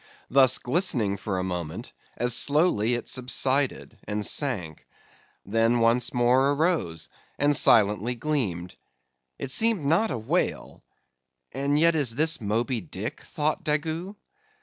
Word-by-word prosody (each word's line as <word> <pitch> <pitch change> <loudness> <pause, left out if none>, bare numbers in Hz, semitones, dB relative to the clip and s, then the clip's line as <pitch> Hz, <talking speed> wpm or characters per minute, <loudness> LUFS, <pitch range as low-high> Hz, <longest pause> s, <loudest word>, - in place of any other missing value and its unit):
Thus 130 -1 +5
glistening 125 - 0
for 95 -1 -4
a 90 - -2
moment, 90 -4 -6 0.2
as 120 0 +1
slowly 140 - +2
it 120 - -6
subsided, 130 +2 -1
and 105 0 -2
sank. 95 - -2 0.6
Then 115 +3 +1
once 115 +1 +2
more 125 +3 +2
arose, 145 - -1 0.3
and 145 +1 +2
silently 105 0 +3
gleamed. 110 - -3 0.6
It 135 - -5
seemed 220 - +2
not 165 +10 +2
a 130 - -3
whale; 110 - -3 0.7
and 140 +3 -1
yet 170 +1 +5
is 140 -8 0
this 155 +1 +2
Moby 115 +3 -2
Dick? 85 - -6
thought 150 +1 -3
Daggoo. 160 +6 -2
125 Hz, 125 wpm, -25 LUFS, 110-150 Hz, 0.7 s, Thus